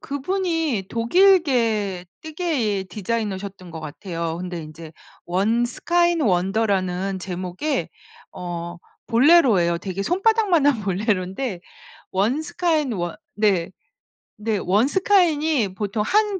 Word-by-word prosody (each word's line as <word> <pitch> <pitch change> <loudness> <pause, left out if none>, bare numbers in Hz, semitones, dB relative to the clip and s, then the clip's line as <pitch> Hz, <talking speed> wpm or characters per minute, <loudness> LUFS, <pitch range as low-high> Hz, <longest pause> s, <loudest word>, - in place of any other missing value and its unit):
그분이 320 - -1
독일계 235 - +2 0.2
뜨개 295 - -1
디자이너셨던 200 -3 -4
것 160 -1 -7
같아요. 165 +1 -5
근데 180 -2 -5
이제 155 +1 -11 0.3
원 210 +7 +1
스카인 345 +7 +1
원더라는 190 -2 0
제목의 185 - -3 0.4
어 175 -1 -6 0.3
볼레로예요. 230 - +4
되게 190 +2 -4
손바닥만 380 - +2
한 260 -7 +3
볼레로인데 190 +1 -1 0.5
원 220 +11 +1
스카인 320 -5 0
원 175 -5 -3 0.2
네. 200 -5 +1 0.7
네 220 -2 0
원 200 +7 +2
스카인이 315 - +2
보통 205 +1 -2
한 415 - +1
215 Hz, 240 characters per minute, -22 LUFS, 185-310 Hz, 0.7 s, 볼레로예요